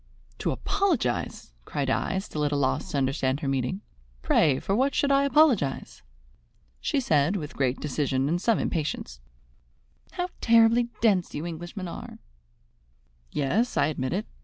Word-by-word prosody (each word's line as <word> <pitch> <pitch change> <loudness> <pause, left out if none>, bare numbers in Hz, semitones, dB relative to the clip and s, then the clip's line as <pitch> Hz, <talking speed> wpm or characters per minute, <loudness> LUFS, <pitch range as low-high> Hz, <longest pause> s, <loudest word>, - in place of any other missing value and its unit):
"To - - -1
apologize?" 345 - -1
cried 140 - -3
I, 190 - 0
still 190 -5 -5
more 150 - +2
at - - -3
a - - 0
loss 140 +5 0
to 145 - -2
understand 135 +1 0
her 145 - -2
meaning. 135 +8 -1 0.4
"Pray, 145 -5 +3
for 195 - -1
what 270 +4 +1
should 280 - +2
I 275 0 +4
apologize?" 270 - +2 0.8
She 285 - 0
said 155 - +2
with 150 -7 -5
great 130 -1 0
decision 135 -2 -1
and 170 +4 0
some 230 0 +2
impatience: 145 - -3 0.9
"How 360 0 -2
terribly 230 +1 +5
dense 200 -6 +2
you 150 - -4
Englishmen 175 +3 -6
are!" 170 - -8 1.1
"Yes, 205 - 0
I 145 - +4
admit 130 -4 -3
it. 205 +4 -2
165 Hz, 155 wpm, -26 LUFS, 140-230 Hz, 1.1 s, terribly